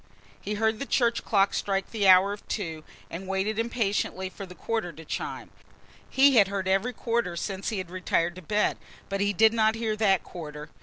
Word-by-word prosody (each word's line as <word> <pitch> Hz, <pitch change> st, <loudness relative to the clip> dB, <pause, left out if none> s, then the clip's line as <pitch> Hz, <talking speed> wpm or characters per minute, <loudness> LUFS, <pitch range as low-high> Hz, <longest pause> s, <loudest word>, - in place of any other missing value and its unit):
He 210 Hz, -, -3 dB
heard 220 Hz, +1 st, +1 dB
the 275 Hz, -, -4 dB
church 235 Hz, -2 st, +1 dB
clock 200 Hz, -2 st, +2 dB
strike 195 Hz, -1 st, -1 dB
the 210 Hz, -4 st, +1 dB
hour 190 Hz, +2 st, +7 dB
of 205 Hz, -, -11 dB
two 165 Hz, -6 st, -4 dB, 0.3 s
and 185 Hz, +3 st, -6 dB
waited 195 Hz, +3 st, -1 dB
impatiently 205 Hz, -5 st, -1 dB
for 195 Hz, -, -8 dB
the 180 Hz, -, -12 dB
quarter 220 Hz, -1 st, -2 dB
to 160 Hz, +1 st, -12 dB
chime -, -, -5 dB, 0.6 s
he 270 Hz, -1 st, +5 dB
had 200 Hz, -3 st, +7 dB
heard 195 Hz, -1 st, -3 dB
every 195 Hz, +6 st, +1 dB
quarter 230 Hz, -6 st, -1 dB
since 190 Hz, +2 st, -3 dB
he 220 Hz, -, -3 dB
had 185 Hz, -2 st, -5 dB
retired 175 Hz, -2 st, 0 dB
to -, -, -8 dB
bed. 210 Hz, +5 st, 0 dB, 0.3 s
But 195 Hz, 0 st, -2 dB
he 205 Hz, 0 st, +2 dB
did 220 Hz, +3 st, +4 dB
not 220 Hz, -1 st, +3 dB
hear 225 Hz, -1 st, -1 dB
that 195 Hz, -4 st, +3 dB
quarter. 150 Hz, -3 st, -8 dB
200 Hz, 200 wpm, -27 LUFS, 185-220 Hz, 0.6 s, hour